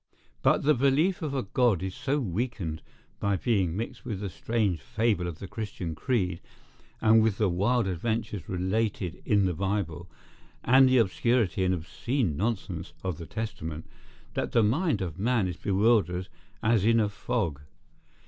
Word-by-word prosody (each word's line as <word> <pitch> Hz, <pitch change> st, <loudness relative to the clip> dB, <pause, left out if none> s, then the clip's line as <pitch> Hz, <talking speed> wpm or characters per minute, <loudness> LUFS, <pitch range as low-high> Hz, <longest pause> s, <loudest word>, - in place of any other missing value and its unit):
But -, -, +3 dB
the 150 Hz, +2 st, +5 dB
belief 145 Hz, +9 st, +2 dB
of 150 Hz, -3 st, -3 dB
a 130 Hz, -, 0 dB
God 105 Hz, -3 st, +2 dB
is 95 Hz, -1 st, -3 dB
so 145 Hz, +4 st, -1 dB
weakened 95 Hz, -, -3 dB, 0.4 s
by 100 Hz, -1 st, +1 dB
being 95 Hz, -6 st, +1 dB
mixed 115 Hz, -, -5 dB
with 110 Hz, -6 st, -4 dB
the 100 Hz, -3 st, -4 dB
strange 100 Hz, +1 st, 0 dB
fable 105 Hz, -1 st, 0 dB
of 85 Hz, -3 st, -5 dB
the 100 Hz, -, -7 dB
Christian 95 Hz, -6 st, -5 dB
creed, 90 Hz, 0 st, -1 dB, 0.6 s
and 110 Hz, 0 st, +6 dB
with 110 Hz, -3 st, +1 dB
the 105 Hz, -3 st, +2 dB
wild 105 Hz, +7 st, +2 dB
adventures 105 Hz, +1 st, -2 dB
related 95 Hz, -1 st, -1 dB
in 100 Hz, -2 st, +3 dB
the 90 Hz, -, +1 dB
Bible, 90 Hz, -2 st, -2 dB, 0.5 s
and 130 Hz, +1 st, +6 dB
the 130 Hz, -, +4 dB
obscurity 115 Hz, -3 st, +2 dB
and 95 Hz, 0 st, +2 dB
obscene 95 Hz, -, -2 dB
nonsense 95 Hz, -3 st, -3 dB
of 90 Hz, -4 st, -3 dB
the 85 Hz, -, -7 dB
Testament, 80 Hz, -8 st, -5 dB, 0.5 s
that -, -, -2 dB
the 115 Hz, -, +5 dB
mind 130 Hz, -, +1 dB
of 85 Hz, -1 st, -6 dB
man 115 Hz, -2 st, +2 dB
is 90 Hz, -, -4 dB
bewildered 100 Hz, -3 st, +2 dB, 0.3 s
as 110 Hz, -2 st, +3 dB
in 115 Hz, +1 st, +4 dB
a 105 Hz, -, +3 dB
fog. 100 Hz, -, -2 dB
105 Hz, 160 wpm, -28 LUFS, 90-120 Hz, 0.6 s, and